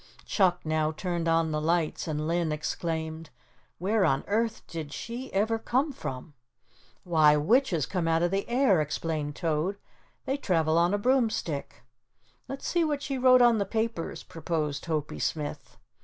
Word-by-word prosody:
Chuck 180 -3 +2
now 155 0 +1
turned 170 0 -3
on 165 -1 +2
the 150 0 -1
lights 165 0 0
and 155 -1 -2
Linn 170 -1 0
exclaimed: 160 +1 -3 0.5
"Where 200 +4 +1
on 135 -6 +2
earth 225 +2 -1
did 160 -3 -6
she 240 +3 -6
ever 220 +3 +1
come 265 +7 0
from?" 135 - -7 0.7
"Why, 155 -4 +5
witches 175 - +2
come 180 -4 -2
out 165 +1 +2
of 175 - +1
the 195 +3 -1
air," 240 - +3
explained 150 -1 -3
Toad. 165 +4 -1 0.5
"They 270 - 0
travel 165 - +2
on 175 +4 +3
a - - +1
broomstick." 220 - 0 0.6
"Let's 270 +1 -6
see 345 -1 +2
what 295 -2 -1
she 270 -2 -3
wrote 255 -1 +6
on 235 -2 +5
the - - +2
papers," 220 -3 -3
proposed 155 -3 -3
Hopie 155 -2 -2
Smith. 150 -2 -4
170 Hz, 155 wpm, -28 LUFS, 155-225 Hz, 0.7 s, wrote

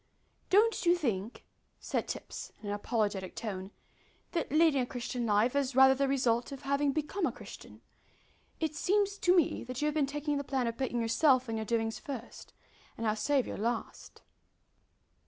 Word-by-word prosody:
"Don't 435 +4 +4
you 345 0 +5
think," 230 - -3 0.3
said - - -2
Tipps, - - -6
in 205 - -5
an - - -1
apologetic 205 -3 -2
tone, 195 -4 -5 0.6
"that 335 -6 -2
leading 310 -3 +4
a - - 0
Christian 245 -1 -3
life 215 +5 +2
is 275 -2 0
rather 265 0 +8
the 275 +1 0
result 250 -2 +1
of 275 0 -8
having 280 +1 +1
become 315 +6 -1
a - - -1
Christian? - - -12 0.8
It 315 -2 -1
seems 400 +5 +1
to 360 +1 +4
me 340 -5 +2
that 255 0 -5
you 295 - 0
have 300 - +1
been 295 -3 +1
taking 295 +1 -2
the 280 - -2
plan 265 -2 -1
of 230 -1 -2
putting 245 -1 -2
yourself 255 +3 +3
and 225 - -3
your 220 - -3
doings 225 0 -1
first, 265 -6 -8 0.5
and 230 - -3
our 215 -1 +2
Saviour 270 +3 0
last." 230 +2 -4
265 Hz, 175 wpm, -31 LUFS, 230-295 Hz, 0.8 s, rather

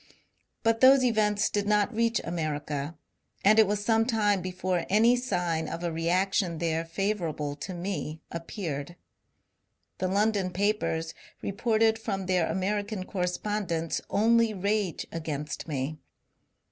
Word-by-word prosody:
But 225 0 +2
those 265 0 +7
events 215 -3 +2
did 205 -1 -1
not 210 +2 +2
reach 230 +1 +2
America, 150 -2 -3 0.5
and 215 +2 +6
it 220 - +6
was 205 0 -1
some 225 0 +4
time 205 -5 +2
before 180 -1 -2
any 225 +5 +5
sign 175 -10 -1
of 165 +1 -5
a 170 - -1
reaction 175 +2 +1
there 165 0 0
favourable 165 -5 -2
to 180 +5 -6
me 170 -4 -4
appeared. 165 -3 -5 1.0
The 185 - 0
London 200 0 +1
papers 180 -4 -1 0.3
reported 220 +2 +2
from 195 -3 -3
their 180 -3 +2
Ameri 205 +2 -1
can 205 -4 -4
correspondents 180 -3 -2
<Hily 230 +1 +3
rage 200 -1 -1
against 150 -2 -4
me. 150 +1 -3
190 Hz, 130 wpm, -28 LUFS, 165-215 Hz, 1.0 s, those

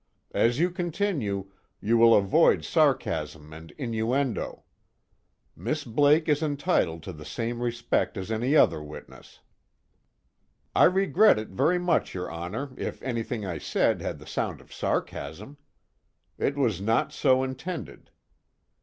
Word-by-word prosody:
As 120 +1 +2
you 175 +4 +2
continue, 165 - -2 0.3
you 115 +3 +1
will 115 0 +7
avoid 100 -2 +4
sarcasm 75 0 0
and 80 +1 -11
innuendo. 120 - -2 0.9
Miss 125 - -3
Blake 145 +6 +3
is 150 -1 +2
entitled 145 - 0
to 95 - -7
the 75 -1 -10
same 120 +6 -4
respect 120 -2 -1
as 95 +3 -5
any 120 +6 +1
other 80 - +4
witness." 75 0 -12 1.3
"I - - +7
regret 195 +3 +4
it 110 0 -5
very 165 - +2
much, 180 - 0
your 90 -2 -4
Honor, 90 +12 -5
if - - -4
anything 115 -3 -3
I 85 -4 -4
said - - +1
had - - -4
the - - -14
sound - - -3
of - - -16
sarcasm. 105 - -4 0.8
It 140 - 0
was 115 -10 +1
not 115 +3 +1
so 130 0 +3
intended. 130 - -6
120 Hz, 135 wpm, -27 LUFS, 95-145 Hz, 1.3 s, will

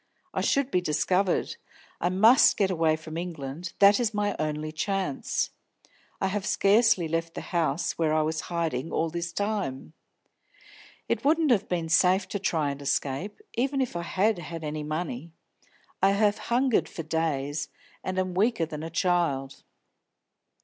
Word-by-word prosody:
"I - - -1
should 275 -1 +1
be 180 - +2
discovered. 180 +4 0 0.4
I 175 - +1
must 220 +8 +6
get 195 -2 +2
away 160 -3 +2
from 155 0 -8
England, 165 -1 -5
that 200 +2 +6
is 225 -3 0
my 205 -1 0
only 155 0 -2
chance. 160 -2 -1 0.7
I - - 0
have 195 +1 -1
scarcely 205 -3 +3
left 165 +1 -2
the - - -4
house 165 -2 0
where 160 -2 +2
I 155 0 +2
was 160 +1 -1
hiding 165 -4 -2
all 160 0 0
this 170 0 -3
time. 195 -8 -3 1.1
It - - -1
wouldn't 310 0 +3
have 215 -5 +2
been 170 -2 -1
safe 185 +3 +3
to 205 - -3
try 160 -6 0
and 140 0 -7
escape, 140 - -2
even 270 +3 0
if 255 -8 -1
I 170 - -2
had 190 +4 +1
had 165 0 -7
any 150 0 -3
money. 155 0 -4 0.7
I 195 +1 +5
have 205 0 +2
hungered 250 0 +2
for 165 - -6
days, 150 -2 -2 0.3
and 185 0 -3
I - - +3
am 185 -1 -3
weaker 200 -1 +2
than 155 -1 -7
a 165 - -5
child." 165 -6 0
170 Hz, 165 wpm, -27 LUFS, 155-200 Hz, 1.1 s, must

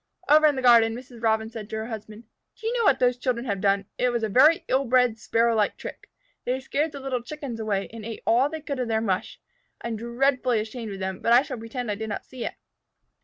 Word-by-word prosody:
Over 305 +1 +6
in 295 - +2
the 260 - -3
garden, 230 -2 +6
Mrs. 245 -1 -11
Robin 220 -1 +1
said 220 -3 -8
to - - -5
her 220 0 -3
husband, 220 -1 -8 0.3
"Do 440 - -13
you 460 +2 0
know 470 -2 +1
what 275 - +5
those 250 -1 +2
children 245 -1 -1
have 200 -5 -2
done? 200 -1 +2
It 250 - +3
was 235 -2 -1
a 220 - 0
very 300 +10 +5
ill 265 +1 +2
bred, 250 -2 +3
Sparrow 230 +2 +2
like 210 -2 +1
trick. - - -9 0.3
They 255 +1 -1
scared 290 +4 -1
the 280 - -8
little 265 -2 -2
Chickens 260 -2 -7
away, 205 -3 -1
and 225 -1 -8
ate 225 0 -7
all 255 +5 +3
they 315 0 -6
could 280 -3 -4
of 250 - -1
their 220 -1 +1
mush. 195 -5 -2 0.4
I 235 - -5
am 225 - -3
dreadfully 245 +1 +1
ashamed 220 0 -5
of 195 - -7
them, 190 0 -3
but 235 - +2
I 245 +3 +7
shall 255 -4 -6
pretend 230 0 -4
I - - 0
did 220 +2 -5
not 205 - -5
see 255 -2 -8
it." - - -3
235 Hz, 255 wpm, -25 LUFS, 220-260 Hz, 0.4 s, I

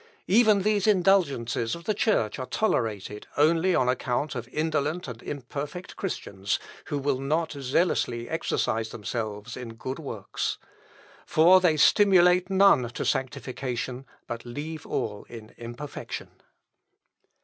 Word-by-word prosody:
Even 210 -1 +4
these 210 -1 +2
indulgences 170 - +2
of 170 - -10
the 215 - 0
Church 195 - +1
are 130 - -4
tolerated, 105 - -1
only 165 +4 +4
on 125 - +2
account 130 +3 0
of 120 -2 -5
indolent 155 +3 -1
and 120 -2 -8
imperfect 145 +6 -6
Christians, 100 - -3 0.3
who 145 - -3
will 140 -1 0
not 155 +4 0
zealously 130 -4 0
exercise 115 -8 -1
themselves 110 +1 -5
in 120 -3 -7
good 130 +5 -5
works. 115 -10 -4 0.7
For 180 +4 +6
they 165 -4 +3
stimulate 180 +1 +5
none 190 -11 +5
to 120 - -4
sanctification, 130 0 -3 0.2
but 115 -1 -6
leave 150 +6 -6
all 105 -2 -3
in 115 -2 -11
imperfection." 120 +5 -7
140 Hz, 125 wpm, -27 LUFS, 120-175 Hz, 0.7 s, For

